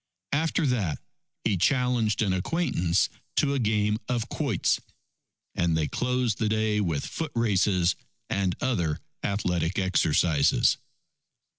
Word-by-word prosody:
After 160 Hz, +2 st, +1 dB
that 110 Hz, -, 0 dB, 0.5 s
he 100 Hz, -3 st, +1 dB
challenged 120 Hz, 0 st, +2 dB
an 95 Hz, -3 st, +1 dB
acquaintance 90 Hz, -, +1 dB, 0.3 s
to 140 Hz, -2 st, +2 dB
a 140 Hz, -, 0 dB
game 105 Hz, -1 st, +1 dB
of 120 Hz, -2 st, -1 dB
quoits. 135 Hz, -, 0 dB, 0.7 s
And 85 Hz, -2 st, +1 dB
they 80 Hz, -2 st, 0 dB
closed 125 Hz, -, -1 dB
the 110 Hz, -, +1 dB
day 110 Hz, -1 st, +1 dB
with 80 Hz, -7 st, -1 dB
foot 160 Hz, -2 st, -4 dB
races 95 Hz, -5 st, +2 dB, 0.3 s
and 95 Hz, -3 st, 0 dB
other 85 Hz, -12 st, 0 dB, 0.3 s
athletic 90 Hz, -3 st, -1 dB
exercises. 85 Hz, -5 st, +3 dB
105 Hz, 120 wpm, -27 LUFS, 90-125 Hz, 0.7 s, exercises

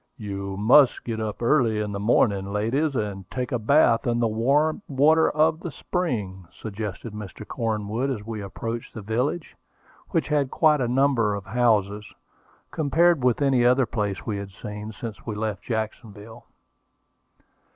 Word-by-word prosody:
"You 100 Hz, -3 st, -5 dB
must 125 Hz, +6 st, +5 dB
get 115 Hz, -2 st, -4 dB
up 110 Hz, +1 st, -4 dB
early 115 Hz, -4 st, +3 dB
in 105 Hz, -1 st, -2 dB
the 100 Hz, -, -4 dB
morning, 100 Hz, -2 st, +2 dB
ladies, 130 Hz, +9 st, 0 dB
and 100 Hz, -5 st, -3 dB
take 125 Hz, +1 st, -4 dB
a 125 Hz, -, 0 dB
bath 115 Hz, +1 st, +3 dB
in 120 Hz, 0 st, +1 dB
the 120 Hz, -, +2 dB
warm 140 Hz, -, +1 dB
water 150 Hz, +4 st, +4 dB
of 155 Hz, +1 st, +2 dB
the 170 Hz, -, -5 dB
spring," 105 Hz, -, -3 dB
suggested 105 Hz, +2 st, -6 dB
Mr. 105 Hz, 0 st, -8 dB
Cornwood 110 Hz, +2 st, -2 dB
as 110 Hz, -6 st, -4 dB
we 110 Hz, -2 st, -5 dB
approached 115 Hz, +4 st, -6 dB
the 110 Hz, -, -7 dB
village, 125 Hz, -, -2 dB, 0.5 s
which 165 Hz, -, -1 dB
had 145 Hz, -3 st, +1 dB
quite 150 Hz, -2 st, +3 dB
a 120 Hz, -, +1 dB
number 125 Hz, -5 st, +2 dB
of 100 Hz, -2 st, -7 dB
houses, 105 Hz, -2 st, +1 dB, 0.6 s
compared 160 Hz, 0 st, +2 dB
with 125 Hz, +3 st, +2 dB
any 135 Hz, -3 st, +3 dB
other 125 Hz, +2 st, +4 dB
place 105 Hz, -5 st, -3 dB
we 105 Hz, -3 st, -2 dB
had 100 Hz, -1 st, -6 dB
seen 105 Hz, +3 st, -7 dB
since 110 Hz, -3 st, -8 dB
we 110 Hz, -, -3 dB
left 105 Hz, -2 st, -3 dB
Jacksonville. 110 Hz, -1 st, -6 dB
115 Hz, 160 wpm, -24 LUFS, 105-135 Hz, 0.6 s, must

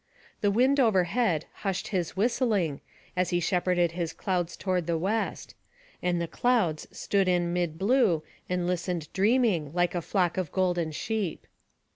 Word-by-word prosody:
The 205 Hz, -, +3 dB
Wind 255 Hz, +7 st, +3 dB
overhead 190 Hz, -, +2 dB, 0.2 s
hushed 195 Hz, -2 st, -2 dB
his 180 Hz, -3 st, -2 dB
whistling, 205 Hz, -, +1 dB, 0.3 s
as 180 Hz, 0 st, +1 dB
he 175 Hz, -, +1 dB
shepherded 175 Hz, -1 st, +1 dB
his 170 Hz, -1 st, -3 dB
clouds 180 Hz, -3 st, -2 dB
toward 180 Hz, -3 st, -1 dB
the 170 Hz, -1 st, +1 dB
west; 205 Hz, +7 st, -2 dB, 0.5 s
and 175 Hz, -1 st, 0 dB
the 170 Hz, -, -2 dB
clouds 210 Hz, -9 st, +1 dB
stood 195 Hz, -2 st, 0 dB
in 175 Hz, -1 st, +1 dB
mid 175 Hz, -3 st, -1 dB
blue, 200 Hz, -, +3 dB, 0.3 s
and 180 Hz, -1 st, 0 dB
listened 180 Hz, -2 st, -2 dB
dreaming, 200 Hz, -, +2 dB
like 175 Hz, -1 st, +2 dB
a 175 Hz, -, -1 dB
flock 180 Hz, 0 st, 0 dB
of 185 Hz, -5 st, -2 dB
golden 175 Hz, -4 st, 0 dB
sheep. 205 Hz, +3 st, -3 dB
180 Hz, 150 wpm, -28 LUFS, 170-205 Hz, 0.5 s, The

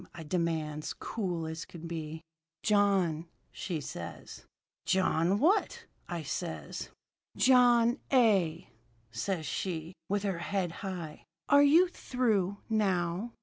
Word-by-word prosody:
I 165 Hz, -, -7 dB
demands, 155 Hz, -2 st, -2 dB
cool 180 Hz, -7 st, -3 dB
as 160 Hz, 0 st, -5 dB
could 170 Hz, -1 st, -9 dB
be. 160 Hz, -1 st, -5 dB, 0.4 s
"'John,' 195 Hz, -6 st, +2 dB, 0.3 s
says 145 Hz, -, -5 dB, 0.5 s
she. -, -, -29 dB
"'John 185 Hz, -1 st, +2 dB
what?' 370 Hz, -, +2 dB, 0.2 s
I 170 Hz, -3 st, -3 dB
says. 80 Hz, -, -5 dB, 0.5 s
"'John 245 Hz, -1 st, +5 dB
A.,' 195 Hz, -, +3 dB, 0.4 s
says 160 Hz, +8 st, -2 dB
she, 165 Hz, +2 st, -3 dB, 0.2 s
with 205 Hz, 0 st, 0 dB
her 195 Hz, -4 st, -1 dB
head 180 Hz, 0 st, -1 dB
high. 180 Hz, -6 st, -6 dB, 0.2 s
'Are 285 Hz, 0 st, +7 dB
you 315 Hz, +6 st, +6 dB
through, 220 Hz, -, 0 dB
now?' 195 Hz, 0 st, 0 dB
180 Hz, 110 wpm, -31 LUFS, 160-215 Hz, 0.5 s, Are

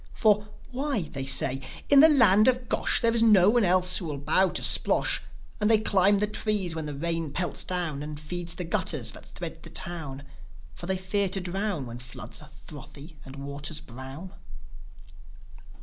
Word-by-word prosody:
For, 210 Hz, -2 st, +2 dB, 0.2 s
"Why," 265 Hz, -, -2 dB
they 135 Hz, -3 st, -7 dB
say, 135 Hz, 0 st, +1 dB
" -, -, -17 dB
in 280 Hz, -, +8 dB
the 315 Hz, +3 st, +8 dB
land 215 Hz, -7 st, +5 dB
of 255 Hz, -1 st, +2 dB
Gosh -, -, +1 dB
There 230 Hz, -1 st, +2 dB
is 230 Hz, -, +2 dB
no 210 Hz, -4 st, +5 dB
one 240 Hz, -1 st, +2 dB
else 180 Hz, 0 st, +3 dB
who 180 Hz, -, -7 dB
will 150 Hz, -3 st, -5 dB
bow 185 Hz, +7 st, +2 dB
to -, -, -4 dB
Splosh. -, -, +3 dB, 0.4 s
And 210 Hz, 0 st, +1 dB
they 225 Hz, -, +6 dB
climb 200 Hz, -2 st, +3 dB
the 210 Hz, -, +1 dB
trees 210 Hz, -4 st, 0 dB
when 160 Hz, -1 st, -5 dB
the 145 Hz, -2 st, -6 dB
rain 165 Hz, 0 st, -2 dB
pelts 175 Hz, +3 st, -2 dB
down 170 Hz, -6 st, -3 dB
And 150 Hz, 0 st, -7 dB
feeds 170 Hz, +2 st, -5 dB
the 180 Hz, -, -5 dB
gutters 165 Hz, -, -1 dB
that -, -, -12 dB
thread -, -, -8 dB
the -, -, -10 dB
town; 150 Hz, -6 st, -5 dB, 0.5 s
For 175 Hz, -, -9 dB
they 190 Hz, 0 st, -1 dB
fear 190 Hz, +1 st, -1 dB
to 195 Hz, -, 0 dB
drown, 185 Hz, -4 st, -3 dB
When 120 Hz, 0 st, -9 dB
floods 125 Hz, +4 st, -9 dB
are 150 Hz, -, -14 dB, 0.2 s
frothy 150 Hz, +1 st, -12 dB
and 135 Hz, 0 st, -11 dB
waters 140 Hz, +2 st, -5 dB
brown." 135 Hz, +9 st, -10 dB
180 Hz, 190 wpm, -26 LUFS, 150-210 Hz, 0.5 s, in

